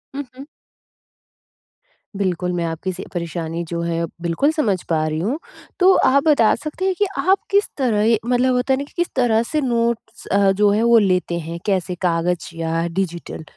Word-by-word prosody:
हुँ, 285 - -3
हुँ। 275 - -8 1.7
बिल्कुल, 180 -2 -1
मैं 170 -1 -1
आपकी 165 +3 -3
स 185 - -7
परेशानी 170 -1 -4
जो 170 0 -2
है 170 0 -1 0.2
बिल्कुल 175 - +1
समझ 215 - 0
पा 155 -1 +1
रही 155 0 -2
हूँ। 240 - -1 0.4
तो 375 +1 +6
आप 275 +1 +4
बता 260 -8 +5
सकते 305 +8 -5
हैं 380 -1 +1
कि 410 - +2
आप 385 +2 +3
किस 405 +1 +3
तरह 225 -3 +2
मतलब 250 +1 +2
होता 255 +2 +1
है - - +2
ना - - -2
कि 285 - -15
किस 345 0 0
तरह 235 -3 +3
से 305 - +2
नोट्स 235 -3 -2
अ, 200 0 +4
जो 205 +1 +3
है 215 +3 +2
वो 235 0 +6
लेते 180 -3 +1
हैं 170 +1 -5
कैसे 185 -3 0
कागज़ 170 0 -1
या 165 +1 -1
डिजिटल? 170 -3 -4
205 Hz, 185 wpm, -20 LUFS, 170-260 Hz, 1.7 s, तो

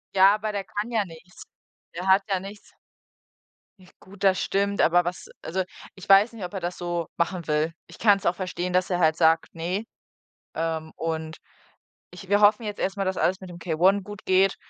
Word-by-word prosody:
Ja, 195 +2 +7
aber 215 0 -3
der 200 -1 -3
kann 205 +4 -4
ja 215 -3 +1
nichts. 170 +1 -13 0.5
Er 180 +3 -6
hat 190 +1 +5
ja 190 -2 +1
nichts. 200 +2 -11 1.1
Nicht 180 - -21
gut, 195 +1 -13
das 190 -1 +3
stimmt, 200 +1 0
aber 175 +1 +4
was 175 0 -5 0.2
also, 185 +3 -1 0.3
ich 190 0 -13
weiß 200 +4 +6
nicht, 215 -5 -8
ob 180 - -5
er 195 - -3
das 175 +1 -5
so 175 -1 -2
machen 170 0 -2
will. 155 +2 0
Ich - - -15
kann's 205 -3 +4
auch 175 - +3
verstehen, 180 -1 -4
dass 185 +1 +2
er 180 - +1
halt 160 -2 +3
sagt: 165 -1 +2
„Ne.“ 180 +6 -3 0.7
Ähm, 160 -1 -3
und 160 -1 -4 0.7
ich 180 +1 -11
wir 205 +1 +3
hoffen 210 +2 +5
jetzt 210 -1 -5
erst 195 +1 -2
mal, 195 - -1
dass 190 0 -1
alles 190 +2 +1
mit 185 -1 -10
dem 175 - -10
K-1 180 +4 +2
gut 205 -1 -10
geht 190 +1 +4
185 Hz, 205 wpm, -25 LUFS, 170-200 Hz, 1.1 s, Ja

